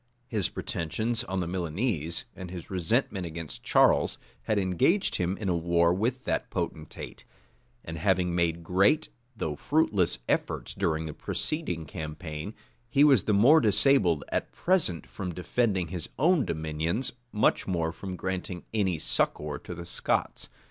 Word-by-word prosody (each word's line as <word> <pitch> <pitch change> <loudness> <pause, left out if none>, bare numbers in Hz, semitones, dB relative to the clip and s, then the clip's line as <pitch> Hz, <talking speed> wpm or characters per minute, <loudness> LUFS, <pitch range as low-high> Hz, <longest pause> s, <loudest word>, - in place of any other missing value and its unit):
His 105 -7 +1
pretensions 110 +8 -2
on 95 0 -2
the 85 - -2
Milanese, 85 - -2
and 95 -1 -7
his 90 0 -8
resentment 95 0 0
against 85 -1 -6
Charles, - - +3 0.3
had 110 - +1
engaged 100 - +2
him 90 +2 -1
in 105 - -4
a 90 - +2
war 85 0 +3
with 120 +7 -1
that - - -1
potentate; 80 -1 -5 0.6
and 80 0 -5
having 90 0 +2
made 85 -1 0
great, 95 - +3 0.3
though 75 -7 -2
fruitless 105 - +2
efforts - - -1
during 80 0 0
the 75 - -5
preceding 90 - -3
campaign, 75 +5 -6 0.3
he 140 +4 +4
was 135 -9 +5
the 105 - +2
more 130 +11 +6
disabled 105 - +4
at - - -2
present 170 - +1
from 90 -4 -6
defending 95 -1 0
his 90 -4 -5
own 160 -2 +3
dominions, 80 - -2 0.2
much 105 - +2
more 85 -3 0
from 95 +2 -6
granting 90 0 -4
any 95 -6 +1
succor 75 -1 0
to 90 - -8
the 85 0 -7
Scots. 85 - -1
90 Hz, 150 wpm, -28 LUFS, 85-110 Hz, 0.6 s, more